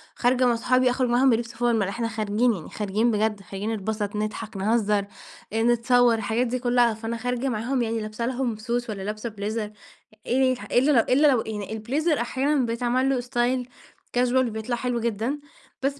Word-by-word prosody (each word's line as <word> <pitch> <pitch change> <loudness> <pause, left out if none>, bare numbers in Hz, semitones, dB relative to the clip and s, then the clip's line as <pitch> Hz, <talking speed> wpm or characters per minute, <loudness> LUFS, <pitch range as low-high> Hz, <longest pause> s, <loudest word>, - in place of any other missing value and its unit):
خارجة 255 +1 +2
مع 240 -1 +3
صحابي 255 +2 +2
أخرج 250 0 0
معاهم 250 +3 +4
بلبس 235 0 0
formal، 235 -2 +2
إحنا 230 +3 -2
خارجين، 220 +2 +1
يعني 175 -7 -7
خارجين 215 +3 0
بجد، 215 -1 0
خارجين 195 +3 -4
نتبسط، 210 0 -3
نضحك، 215 0 -4
نهزر، 210 0 +1 0.5
آآ، 225 0 +1
نتصور، 240 +1 +4
الحاجات 225 +3 0
دي 255 +2 -2
كلها، 245 -1 +3
فأنا 225 +1 -4
خارجة 250 +3 -2
معاهم 245 +3 -1
يعني 225 -1 -1
لابسة 215 +2 -4
لهم 245 -2 -1
Suit 235 +2 -2
والّا 205 -3 -4
لابسة 215 +3 -4
بليزر، 210 +1 -4 0.6
آآ، - - -3 0.4
إلا 265 +5 +4
لو 260 - +5
إلا 285 +4 +5
لو 255 -5 +4
يعني 210 -2 -5
البليزر 280 +8 0
أحيانًا 265 +2 +1
بيتعمل 245 +3 0
له 270 -2 +1
استايل 245 +1 -1 0.5
casual 245 0 +2
وبيطلع 220 +2 -3
حلو 245 0 -2
جدًا. 235 +5 -2 0.4
بس 275 +1 -1
235 Hz, 175 wpm, -25 LUFS, 215-250 Hz, 0.6 s, لو